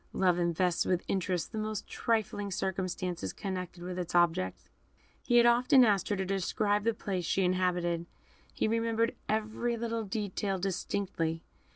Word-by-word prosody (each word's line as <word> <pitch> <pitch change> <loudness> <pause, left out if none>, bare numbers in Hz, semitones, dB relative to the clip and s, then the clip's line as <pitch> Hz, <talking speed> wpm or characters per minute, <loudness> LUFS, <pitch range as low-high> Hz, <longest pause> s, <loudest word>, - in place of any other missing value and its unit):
Love 180 -2 +2
invests 170 0 +1
with 180 -1 0
interest 185 -2 -1
the 220 - -3
most 215 -1 -3
trifling 215 -3 -1
circumstance 185 -2 -2
connected 185 -3 -5
with 180 0 -4
its 175 0 -4
object. 165 - +2 0.5
He 240 - +3
had 235 - +7
often 250 +2 +6
asked 200 -4 +2
her 205 - +1
to 190 -1 -2
describe 205 +2 0
the 230 -1 +2
place 190 -4 -3
she 190 +3 +1
inhabited. 180 -2 0 0.4
He - - 0
remembered 230 +1 +1 0.2
every 220 +2 -1
little 230 -1 -2
detail 200 -1 -2
distinctly. 175 -3 -2
195 Hz, 150 wpm, -31 LUFS, 180-220 Hz, 0.5 s, had